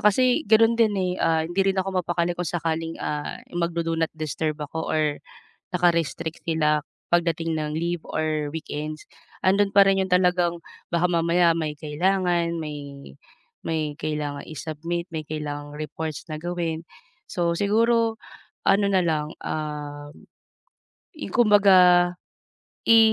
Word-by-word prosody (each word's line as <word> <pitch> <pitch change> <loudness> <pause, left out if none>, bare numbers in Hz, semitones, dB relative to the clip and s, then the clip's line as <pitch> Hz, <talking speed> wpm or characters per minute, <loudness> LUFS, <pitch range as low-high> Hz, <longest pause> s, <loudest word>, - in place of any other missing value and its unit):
kasi 245 +5 +4
gano'n 225 +1 +6
din 215 -2 +4
eh, 185 -1 0
ah, 160 -1 +2
hindi 175 +4 -1
rin - - -10
ako 190 -1 0
mapakali 175 0 -1
kung 175 -2 -3
sakaling, 165 -1 -2
ah, 150 -1 -4 0.2
magdo-do 170 -1 -1
not 165 -1 +1
disturb 155 0 -2
ako 155 +2 -5
or 150 -2 0 0.6
naka-restrict 170 -2 0
sila 150 -2 +2 0.3
pagdating 165 -1 +1
ng 150 0 -3
leave 170 +1 -1
or 155 -1 -1
weekends, 155 -1 -5 0.4
andoon 200 +2 +4
pa 200 0 +7
rin 195 0 +3
yung 190 - -3
talagang 180 -1 +3 0.3
baka 170 +1 +2
mamaya 170 0 +3
may 155 -2 -3
kailangan, 170 +2 0
may 145 - -7 0.5
may 155 -2 -1
kailangang 150 -2 -3
i-submit, 165 +2 -4
may 155 -1 -3
kailangang 145 -1 -5
reports 155 +1 -5
na 155 - -4
gawin. 170 -2 -3 0.5
So, 170 -1 0
siguro 225 +3 +2 0.5
ano 200 +1 +4
na 190 - +4
lang, 155 -1 -1
um, 145 -1 -5 1.0
i 305 - -6
kumbaga, 190 -6 +6 0.7
i 225 0 +7
165 Hz, 130 wpm, -24 LUFS, 155-180 Hz, 1.0 s, pa